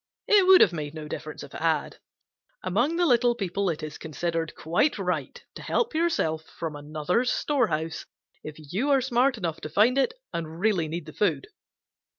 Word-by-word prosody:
It 400 -3 +5
would 375 -1 +8
have 180 - +5
made 150 -2 -5
no 155 -1 -7
difference 155 0 -7
if 140 - -12
it - - -7
had. 160 -1 0 0.6
Among 235 - +1
the 350 +1 +2
little 245 -4 +3
people 195 -1 -1
it 160 -3 -3
is 155 -1 -7
considered 165 +1 -3
quite 175 - +1
right 180 -8 -3
to - - -9
help 470 - 0
yourself 310 - 0
from 160 -3 -4
another's 155 +11 -1
storehouse 165 - -1 0.4
if 155 - -7
you 180 - -3
are 275 -2 +4
smart 255 0 +2
enough 170 -6 -3
to 155 - -6
find 220 - +3
it 270 - +1 0.2
and 160 0 -5
really 190 -5 +1
need 165 +1 -5
the 155 - -10
food. 165 -10 0
175 Hz, 180 wpm, -26 LUFS, 155-245 Hz, 0.6 s, would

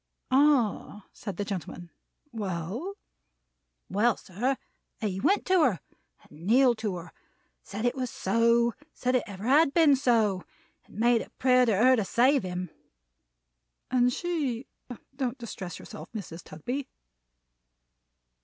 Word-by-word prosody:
"Ah!" 255 -7 +2
said 200 -4 -7
the 205 - -2
gentleman. 175 -3 -6 0.4
"Well?" 210 - -4 0.9
"Well, 215 +3 +2
sir, 245 +9 -2 0.4
he 195 -4 -2
went 395 - +2
to 370 -2 +4
her, 235 - +2 0.4
and 160 +5 -12
kneeled 245 +1 +4
to 210 -4 -2
her; 170 -1 -8 0.5
said 210 +4 -5
it 245 - +2
was 255 -2 -3
so; 235 +4 +2 0.2
said 250 0 -1
it 255 - +3
ever 200 -1 -8
had 275 +4 +4
been 315 -4 +6
so; 225 -8 +2 0.4
and - - -16
made 235 +1 +3
a - - -9
prayer 255 -1 +4
to 215 -4 +2
her 255 +5 +6
to 220 - 0
save 260 +7 +3
him." 180 -2 -5 1.2
"And 250 -1 +3
she? 280 -7 -2 0.5
Don't 260 -1 -2
distress 195 -7 -7
yourself, 155 +3 -10
Mrs. 180 -6 -7
Tugby." 250 - -5
235 Hz, 135 wpm, -28 LUFS, 195-260 Hz, 1.2 s, been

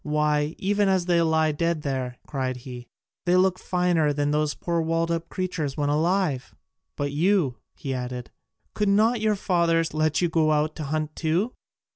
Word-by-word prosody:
Why, 150 0 +1
even 205 +1 +1
as 190 -2 +2
they 175 -1 +3
lie 160 -1 +2
dead 165 +1 -1
there," 130 -3 -3
cried 130 -3 -3
he, 125 -2 -8 0.4
"they 175 - +4
look 185 0 +3
finer 175 -4 +1
than 145 0 0
those 150 0 0
poor 170 -1 -1
walled 165 +1 0
up 165 0 -2
creatures 165 -7 -3
when 145 -1 0
alive! 155 -3 0 0.4
But 145 0 -2
you," 160 -4 +2 0.2
he 135 -2 -4
added, 125 -1 -5 0.4
"could 210 -1 0
not 220 +3 +3
your 215 -1 +2
fathers 170 -4 +1
let 155 0 +1
you 175 - +2
go 160 -2 +2
out 155 +1 0
to 155 - -4
hunt 155 +1 -2
too?" 170 +9 0
160 Hz, 175 wpm, -25 LUFS, 145-180 Hz, 0.4 s, they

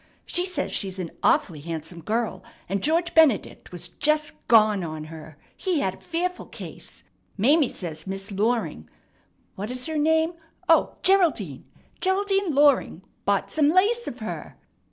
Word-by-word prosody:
She 355 - +1
says 365 -6 -1
she's 190 -2 -2
an 180 -3 -5
awfully 155 -4 +2
handsome 165 +2 -6
girl, 225 +6 -2 0.2
and 195 +1 -1
George 335 - +1
Benedict 310 -9 +3
was 175 -2 -4
just 305 +1 0
gone 215 -4 +5
on 155 -2 -5
her. 155 -1 -11 0.2
He 355 -6 0
had 190 - 0
a - - -14
fearful 360 +2 -3
case. - - -10 0.3
Mame 275 +7 +4
says 160 -3 -6
Miss 195 +2 -5
Loring 200 - -1 0.6
what 205 +3 -5
is 255 0 -4
her 315 -1 -2
name? 320 +2 +2 0.3
O, - - +4
Geraldine 320 - +2 0.3
Geraldine 390 -3 +1
Loring 280 - +3 0.2
bought 200 -1 +1
some 300 -2 +3
lace 415 +8 +3
of 240 - -5
her. 220 -3 -7
240 Hz, 150 wpm, -25 LUFS, -, 0.6 s, gone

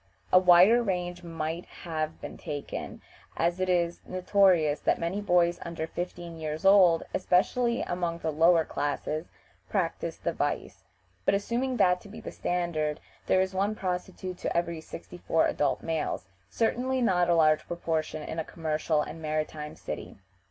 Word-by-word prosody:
A 185 - +9
wider 185 +6 +7
range 180 -4 -2
might 165 0 -4 0.2
have 160 -2 -3
been - - -7
taken, 145 -3 -6 0.3
as 170 +2 +1
it 185 0 0
is 175 -1 +1
notorious 185 -5 +3
that - - +1
many 175 +5 -2
boys 175 -3 +3
under 170 -1 -4
fifteen 175 0 -6
years 155 +2 -4
old, 190 -4 +6
especially 235 +7 +2
among 175 -1 -2
the 160 -1 -2
lower 165 +1 +4
classes, 150 +2 -2 0.4
practice - - -1
the - - -2
vice; - - -3 0.4
but - - +3
assuming 245 +5 -1
that 180 -3 +3
to 205 - -13
be 220 +3 -9
the - - -7
standard, 160 -4 -1 0.3
there 185 - +4
is 190 0 -1
one 200 +3 0
prostitute 185 -1 -4
to - - -1
every 170 -1 -1
sixty 175 +2 -10
four 165 - +2
adult 145 -2 0
males, 160 - -2 0.2
certainly 250 +3 0
not 180 -7 +2
a 170 - +5
large 155 -2 +3
proportion 160 -2 -2
in 160 - -5
a - - -1
commercial 155 -1 -1
and 160 +2 -8
maritime 155 -1 -3
city. - - -7
175 Hz, 160 wpm, -28 LUFS, 160-185 Hz, 0.4 s, A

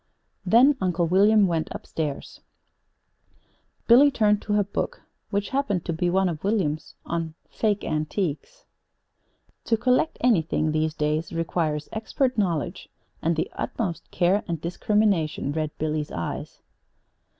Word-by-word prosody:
Then 245 +9 +5
Uncle 180 -2 +1
William 200 +4 +5
went 165 -3 -1
up - - -8
stairs. 150 -3 -5 1.4
Billy 260 +5 +7
turned 210 -6 +2
to 210 - -2
her 205 0 +3
book, 200 - -4 0.3
which 200 0 -1
happened 225 - -1
to 170 - -1
be 175 +2 0
one 190 +1 +2
of 160 -3 -4
William's 185 -7 -1
on 165 -2 -3 0.2
"Fake 210 -2 0
Antiques." 165 - -3 1.0
"'To 225 - +1
collect 250 +7 +1
anything, 160 -9 +2
these 155 0 0
days, 155 +2 -1
requires 160 -2 -1
expert 250 +4 -1
knowledge, 175 -8 -2 0.3
and 165 +1 +1
the 160 - -2
utmost 180 -7 -4
care 185 +4 +2
and 170 -2 -2
discrimination,'" 175 -3 0
read 155 0 -1
Billy's 155 -1 -2
eyes. 85 -1 -5
180 Hz, 130 wpm, -25 LUFS, 155-210 Hz, 1.4 s, Billy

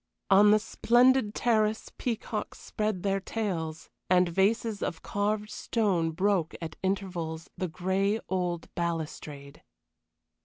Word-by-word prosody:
On 200 +2 +7
the 210 - +7
splendid 240 +1 +3
terrace 220 -2 +1
peacocks 225 -3 -3
spread 210 -4 -2
their 195 -1 +1
tails, 180 -7 -4 0.2
and 180 0 +5
vases 205 +4 +1
of 165 - -3
carved 210 +1 -1
stone 190 -8 0
broke 185 0 0
at 165 -2 -6
intervals 180 -4 -3
the 185 - -2
gray 190 +5 0
old 180 -3 -2
balustrade. 155 -4 -4
195 Hz, 115 wpm, -29 LUFS, 170-215 Hz, 0.2 s, On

